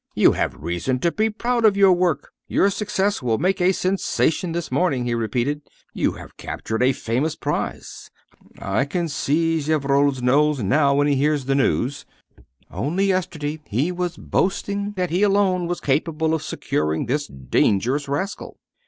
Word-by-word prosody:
"You - - +5
have - - -1
reason 85 - -2
to 170 - +2
be 220 +3 +1
proud 235 +2 -1
of 210 -2 +5
your 195 -2 +6
work; 175 -5 0 0.2
your 200 - +2
success 205 -2 -1
will 115 -3 +1
make 185 - 0
a 180 +1 +4
sensation 185 -2 0
this 170 0 -4
morning," 135 -9 +1
he 120 - -1
repeated. 120 +6 -1 0.3
"You - - 0
have - - -12
captured 110 +1 -4
a 130 +1 +4
famous 130 +5 -1
prize. - - -4 0.5
I 135 - -1
can 170 +4 -2
see 160 +3 0
Gevrol's 140 -2 +1
nose 145 0 +3
now 140 +6 +3
when 145 +1 +3
he 145 -2 +2
hears 145 -1 +1
the 135 - +1
news. 135 0 0 0.6
Only 150 - -1
yesterday 160 -5 -2
he 135 - 0
was 180 -1 -3
boasting 200 +2 -1
that 180 -3 -2
he 180 +3 +1
alone 195 -3 +2
was 175 0 -2
capable 160 +3 0
of 160 - 0
securing 75 +1 -2
this 145 +4 -1
dangerous 105 - 0
rascal." 150 +9 -4
150 Hz, 160 wpm, -22 LUFS, 135-185 Hz, 0.6 s, your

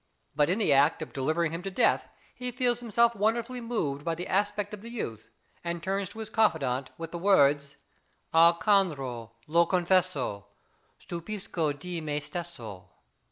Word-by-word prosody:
But 150 +1 +3
in 185 - +2
the 205 -10 +3
act 145 +3 +4
of - - -11
delivering 155 +4 0
him 165 +1 -4
to 195 - -4
death, 190 - +2 0.2
he 250 0 -4
feels 245 -1 +1
himself 235 0 +2
wonderfully 235 +4 0
moved 155 -13 -2
by 165 0 -1
the 175 +2 -5
aspect 205 +1 0
of 210 - -7
the 230 - -8
youth, 115 - -5 0.3
and 170 -1 -4
turns 195 0 -1
to - - -10
his 215 - -6
confidant 140 - +1
with 165 0 -6
the 170 - -5
words: 145 -7 +3 0.6
Alcandro, 165 - +3 0.2
lo 170 +2 +3
confesso, 175 - +1 0.5
stupisco 170 -3 -3
di 175 +3 -6
me 150 -1 -2
stesso. 125 - -7
170 Hz, 160 wpm, -28 LUFS, 145-205 Hz, 0.6 s, act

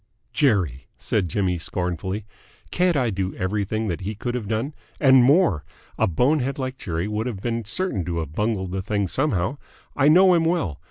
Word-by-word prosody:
"Jerry!" 95 - +1
said 95 -5 -1
Jimmy 90 0 0
scornfully. 90 +4 -3 0.5
"Can't 180 -3 +2
I 125 -4 +1
do 95 -1 -3
everything 105 +3 -1
that 85 - -3
he 105 +3 -4
could 120 +4 -4
have 120 -4 -3
done? 115 +7 -2 0.3
And 130 -3 +6
more. 135 - +4 0.3
A - - +2
bonehead 130 - +1
like 130 -1 -4
Jerry 85 +1 -3
would 105 +2 -2
have 110 -6 -4
been 115 +1 -3
certain 115 - -1
to 85 -1 -3
have 80 -3 -4
bungled 105 -2 -1
the 95 +1 -2
thing 100 0 -1
somehow. 125 - 0 0.4
I 140 0 +3
know 185 +4 +7
him 170 -2 +3
well. 160 - 0
110 Hz, 180 wpm, -23 LUFS, 95-135 Hz, 0.5 s, know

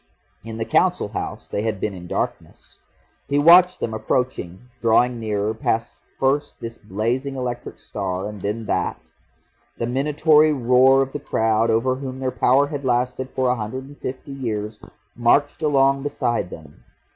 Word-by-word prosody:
In 110 0 -7
the 115 - -2
Council - - +2
House - - -5
they 100 - -2
had 110 -2 -2
been 105 - -2
in 90 -1 -9
darkness. - - -5 0.5
He 140 - +1
watched 175 +4 +6
them 110 - -3
approaching, 110 -3 -2
drawing 120 +1 +3
nearer 105 -1 -1
past 110 -7 -2 0.2
first 145 +2 0
this 115 0 -7
blazing 115 +7 -2
electric 125 -2 -5
star 90 +1 -4
and 105 -2 -8
then 105 +3 -3
that; - - -1 0.8
the 115 - -1
minatory 150 +4 +3
roar 130 +1 +4
of 135 - -8
the 145 - -3
crowd 115 -4 +1
over 125 +3 +1
whom 130 -1 -6
their 130 -1 -1
power 130 +2 +3
had 145 -1 -5
lasted 125 +1 0
for 130 0 -1
a 125 - +2
hundred 115 +3 -5
and 145 +1 -14
fifty 130 +2 -6
years 110 -5 -4 0.4
marched 130 +6 +2
along 135 -2 +3
beside 120 -8 -1
them. 75 -4 -12
125 Hz, 160 wpm, -22 LUFS, 110-135 Hz, 0.8 s, watched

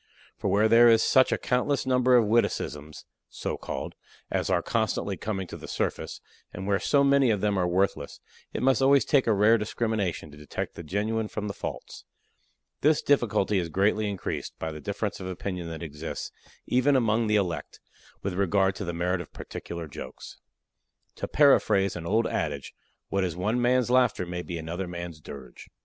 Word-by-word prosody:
For - - -4
where 105 +2 +4
there 115 +1 +7
is 115 -1 +5
such 130 0 +4
a - - +2
countless 125 +3 0
number 125 -1 +4
of 115 - +4
witticisms 80 -9 -1 0.2
(so - - -4
called) - - -5 0.4
as - - -1
are - - +2
constantly - - -1
coming 95 -3 -3
to - - -9
the - - -10
surface, - - -3 0.3
and 95 - -7
where 100 0 +1
so 140 -1 +3
many 140 -2 +4
of 105 -3 +2
them 105 0 +1
are 90 -2 +1
worthless, 95 +2 -1 0.3
it - - -4
must 135 +1 +3
always 135 +1 +5
take 140 -4 +3
a - - +4
rare 105 +2 +4
discrimination 105 -7 -2
to 75 - -13
detect 75 0 -5
the - - -8
genuine 105 +6 -1
from 105 0 -4
the 100 - -4
false. - - -7 0.8
This 150 +1 +3
difficulty 105 -7 +2
is 85 -2 -3
greatly 105 +5 +1
increased 100 -2 -5
by 80 - -4
the 75 -1 -8
difference - - -3
of 95 - -6
opinion 90 -1 -4
that 80 +1 -6
exists, 75 0 -6 0.3
even 130 +3 +3
among 115 -2 +2
the 105 - +2
elect, 90 -5 -2 0.4
with 100 - -2
regard 95 +1 +2
to 100 - -4
the 85 - -3
merit 90 +2 -1
of 85 - -11
particular 85 -2 -7
jokes. 70 - -10 0.8
To - - -3
paraphrase 105 -9 +4
an 85 -1 -6
old 110 +4 +2
adage, 70 -2 -3 0.4
what 100 -1 0
is 90 -3 -2
one 105 +7 0
man's 125 0 +2
laughter 125 -7 +3
may 90 0 -4
be 90 -1 -5
another 85 +3 -4
man's 85 -2 -7
dirge. 65 -4 -11
100 Hz, 185 wpm, -27 LUFS, 85-115 Hz, 0.8 s, there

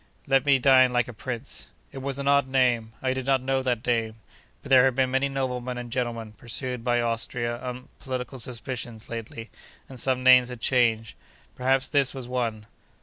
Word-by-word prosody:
Let 135 +1 +2
me 140 -1 +6
dine 130 -1 +5
like 120 -1 +1
a 120 - -8
prince.' 120 +3 -5 0.2
It 135 - -8
was 135 0 -3
an 140 0 -3
odd 140 -1 +4
name. 125 -4 +1
I 130 0 +1
did 130 0 -5
not 135 -1 +3
know 135 +1 0
that 125 -3 -1
name. 115 -2 0 0.5
But, 140 - -9
there 130 -1 +7
had 130 -2 +2
been 130 -1 +1
many 135 +1 +1
noblemen 125 -2 -3
and 120 -1 -7
gentlemen 120 -3 -3
pursued 120 +2 -5
by 120 -1 +2
Austria 120 +1 -2
on 125 0 -6
political 130 0 -5
suspicions, 120 -2 -6
lately, 115 0 -7 0.4
and 130 -2 -11
some 130 +1 0
names 125 -1 +7
had 125 -2 -7
changed. 115 -4 +1 0.4
Perhaps 130 +1 +1
this 140 -2 +2
was 130 -2 -6
one. 115 -4 -2
125 Hz, 190 wpm, -26 LUFS, 120-130 Hz, 0.5 s, there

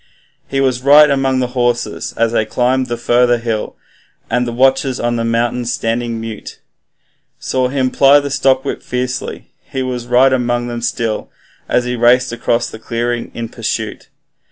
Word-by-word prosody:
He 135 - -2
was 130 -2 +1
right 145 +2 +7
among 135 -1 +1
the 125 - -1
horses 120 -2 -1
as 115 0 +2
they 115 - +1
climbed 125 +4 0
the 120 -1 -3
further 120 +1 +3
hill, 115 -2 -3 0.6
And 125 +1 +1
the - - -2
watchers 135 +1 +2
on 120 0 0
the 115 - -1
mountain 115 +1 0
standing 115 0 -2
mute, 110 -1 -8 0.8
Saw 130 -1 -1
him 130 -1 -1
ply 140 +1 +6
the 140 -1 -5
stockwhip 135 0 +1
fiercely, 125 +1 -4 0.2
he 130 - -3
was 125 -2 -4
right 130 +2 +4
among 120 -1 0
them 120 -1 -5
still, 115 -2 -2 0.4
As 125 - +1
he 125 0 -2
raced 125 +2 +3
across 120 0 0
the 110 - -9
clearing 120 +1 -3
in 115 0 -4
pursuit. 110 -1 -4
120 Hz, 165 wpm, -16 LUFS, 120-130 Hz, 0.8 s, right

